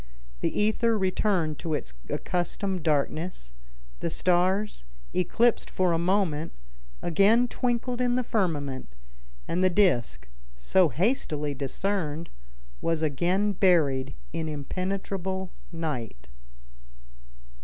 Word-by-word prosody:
The - - -1
ether 220 +2 +2
returned 185 -5 +1
to 160 -2 -1
its 65 - -5 0.2
accustomed 180 +1 -1
darkness; 150 - -1 0.5
the - - -1
stars, 185 - +1 0.3
eclipsed 230 +6 +2
for 185 -2 +1
a 165 - +1
moment, 170 -4 +1 0.5
again 205 +8 +4
twinkled 245 0 -1
in 245 -1 +2
the 255 - +1
firmament, 145 - -2 0.5
and 180 +2 0
the 185 - +5
disc, 125 - +2 0.3
so 160 - +3
hastily 150 - 0
discerned, 160 +3 -2 0.5
was 165 -1 0
again 175 +7 +1
buried 155 - +3 0.2
in 160 -1 -2
impenetrable 190 +4 -3 0.2
night. 125 - -4
175 Hz, 100 wpm, -27 LUFS, 150-195 Hz, 0.5 s, the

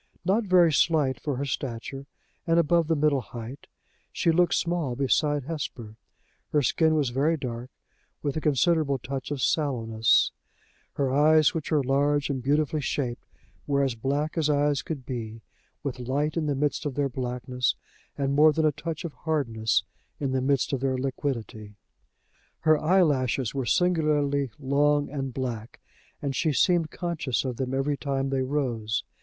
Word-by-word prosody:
Not 210 +5 +2
very 180 -4 +5
slight 140 -5 +2
for 145 -3 -2
her 140 +3 -2
stature, 135 +1 -5 0.4
and 165 0 +3
above 170 0 +3
the 165 - +2
middle 145 -2 +2
height, 120 +4 -9 0.4
she 165 - +1
looked 175 +1 +3
small 170 -7 -1
beside 145 +2 +1
Hesper. 125 -7 -6 0.6
Her 150 -1 +2
skin 160 +5 +2
was 145 -5 +1
very 150 +6 +1
dark, 125 -2 -5 0.5
with 140 -2 -1
a 155 - -2
considerable 150 0 +2
touch 130 +1 -5
of 140 -3 -3
sallowness; 115 -8 +2 0.6
her 135 -2 0
eyes, 155 +3 +5
which 160 -4 -4
were 150 -3 +2
large 145 +2 +1
and 130 -2 -3
beautifully 150 +3 +1
shaped, 130 -3 -3 0.4
were 140 -1 +2
as 135 -3 0
black 140 +8 -2
as 155 -1 +1
eyes 145 -1 +2
could 140 -3 -6
be, 115 -3 -6 0.4
with 135 -3 -4
light 140 +5 -1
in 160 -3 -1
the 145 - 0
midst 145 +2 -1
of 135 - -5
their 145 0 +1
blackness, 125 -1 -2 0.4
and 140 -1 0
more 155 +2 +6
than 160 +1 +1
a 155 - +4
touch 160 +3 -5
of 160 - -5
hardness 115 -9 0 0.4
in 140 -2 -1
the 130 0 0
midst 140 +1 +1
of 135 - 0
their 130 0 0
liquidity; 125 -6 -4 0.9
her 155 0 +5
eyelashes 145 - +2
were 135 -3 -2
singularly 150 -6 +2
long 145 +1 +1
and 135 -2 -3
black, 120 -3 -5 0.4
and 140 -2 -2
she 155 +5 +1
seemed 165 +2 +2
conscious 160 -8 -2
of 125 -3 -3
them 130 -1 -2
every 140 +2 0
time 135 -1 -2
they 135 -1 +1
rose. 125 -6 -1
140 Hz, 165 wpm, -26 LUFS, 130-155 Hz, 0.9 s, more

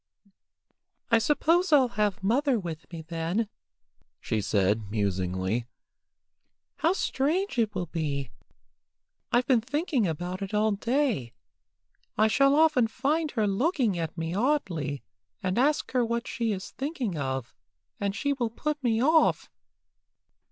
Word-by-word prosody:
"I 230 - +6
suppose 330 +8 +2
I'll 270 -4 +5
have 205 -3 -1
mother 255 +5 +2
with 165 -3 -7
me 165 -2 -7
then," 165 +7 -2 0.7
she 110 0 -1
said, 100 +1 +1
musingly. 95 +2 -1 1.1
"How 330 +3 +2
strange 330 -1 0
it 220 -2 +1
will 180 -1 -1
be! 145 -6 -3 1.0
I've 245 +1 +3
been 250 -4 +3
thinking 270 - 0
about 175 +4 -4
it 195 +1 -3
all 215 +1 +3
day. 225 - 0 0.8
I 215 - +5
shall 275 +5 +4
often 305 -6 +4
find 300 +7 0
her 215 - +3
looking 235 - +1
at 165 +1 -4
me 165 +1 -3
oddly, 185 - -1 0.4
and 185 +4 0
ask 290 +4 +2
her 250 -1 +2
what 235 +1 -2
she 230 -2 -1
is 190 -2 -5
thinking 265 - -3
of, 130 -4 -3 0.5
and 200 -1 -1
she 285 +3 0
will 245 -4 -1
put 295 +5 -3
me 230 -1 +2
off. 315 +3 +3
220 Hz, 135 wpm, -27 LUFS, 165-275 Hz, 1.1 s, I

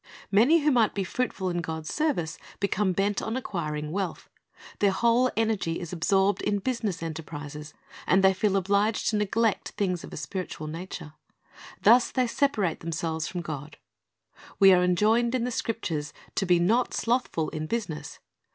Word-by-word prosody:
Many 250 +12 +5
who 300 +1 +3
might 235 -5 +3
be 200 - 0
fruitful 190 -2 -2
in 175 - -1
God's 160 -1 -5
service 285 - -1 0.2
become 200 0 +1
bent 195 +3 0
on 225 +3 -2
acquiring 150 -10 -3
wealth. 190 0 -4 0.5
Their 200 - +4
whole 235 +5 +3
energy 215 -7 0
is 175 -1 -7
absorbed 190 +4 +2
in 205 - 0
business 210 -6 -2
enterprises, 150 -2 -7 0.3
and 190 +1 +4
they 190 0 +6
feel 195 +1 +1
obliged 200 +4 +1
to - - -1
neglect 210 +1 0
things 180 -4 -1
of - - -9
a - - -7
spiritual 175 -1 -5
nature. 160 -1 -7 0.7
Thus 240 +1 +6
they 255 -1 +1
separate 225 - 0
themselves 160 -1 -3
from 180 - -4
God. 155 -2 -7 0.8
We 195 -1 +8
are 180 0 +4
enjoined 220 +7 +3
in 245 - 0
the 250 - -1
Scriptures 170 -11 -3 0.2
to 195 - -1
be 175 -1 +5
"not 220 +9 +2
slothful 230 -10 0
in 155 0 -4
business."' 160 -8 -4
190 Hz, 160 wpm, -27 LUFS, 165-225 Hz, 0.8 s, We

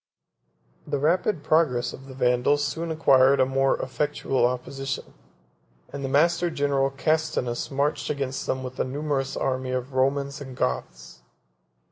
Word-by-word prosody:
The 145 -1 -1
rapid 165 +3 +1
progress 155 -6 +2
of 135 +1 -11
the 130 - -10
Vandals 125 +3 +2
soon 165 +3 -3
acquired 135 -4 +4
a 130 - +5
more 135 +1 +1
effectual 135 -2 0
opposition; 130 +2 -4 0.8
and 140 -1 -5
the 135 - -2
master 170 +5 +3
general 140 -3 +1
Castinus 135 -3 -1
marched 140 +2 -1
against 135 -2 -3
them 130 0 -1
with 130 0 -7
a - - +3
numerous 135 0 -2
army 130 -1 -1
of 130 +1 -3
Romans 140 +2 0
and 130 -2 -9
Goths. 60 -1 -3
135 Hz, 140 wpm, -25 LUFS, 130-145 Hz, 0.8 s, a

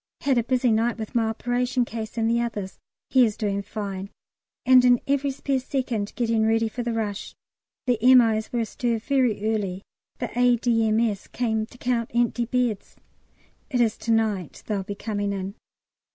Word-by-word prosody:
Had 270 -3 +2
a - - 0
busy 250 0 +1
night 225 +1 +1
with 220 -2 -6
my 230 -2 +2
operation 245 +2 0
case 225 0 -6
and 225 -1 +1
the 235 +1 +2
others 205 -5 -4 0.3
(he 260 -1 +6
is 215 -3 +1
doing 200 -2 -1
fine), 200 -1 -5 0.6
and 255 -1 +7
in 245 -1 +5
every 280 0 +1
spare 270 0 -1
second 250 -6 -2
getting 230 -2 +1
ready 225 +1 +2
for 240 +3 -5
the 240 0 -2
rush. 215 -3 -3 0.5
The 245 -3 +1
M.O.'s 230 -3 +5
were 240 - 0
astir 230 +1 -1
very 225 -3 +1
early; 195 -3 -3 0.3
the 245 - -5
A.D.M.S. 230 -3 +2
came 220 -3 -1
to 245 - -16
count 240 -2 -1
empty 240 0 +1
beds. 240 -4 -1 0.7
It 255 -4 0
is 230 -3 +3
to 230 - -2
night 215 -7 0
they'll 205 -2 -1
be 200 +1 -6
coming 205 -1 -2
in. 195 0 -4
230 Hz, 170 wpm, -25 LUFS, 215-245 Hz, 0.7 s, and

